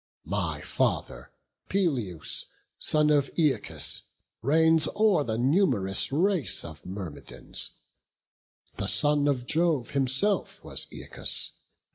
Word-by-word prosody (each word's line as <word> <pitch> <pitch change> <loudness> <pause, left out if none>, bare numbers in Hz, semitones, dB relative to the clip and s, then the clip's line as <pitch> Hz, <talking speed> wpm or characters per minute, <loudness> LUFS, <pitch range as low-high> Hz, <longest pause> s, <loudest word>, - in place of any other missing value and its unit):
My - - -2
father - - -2 0.4
Peleus, 125 - -1 0.3
son 150 0 +3
of 145 -2 +2
Æacus, 155 -5 0 0.4
Reigns 160 +5 +3
o'er 210 -8 +3
the 110 -4 -2
num'rous 125 - +2
race 165 - +1
of 80 0 -10
Myrmidons; 90 -6 -2 1.1
The - - -1
son 145 -1 +3
of 130 -4 0
Jove 155 -4 0
himself 140 +10 0
was - - -2
Æacus. - - 0
145 Hz, 100 wpm, -27 LUFS, 115-165 Hz, 1.1 s, son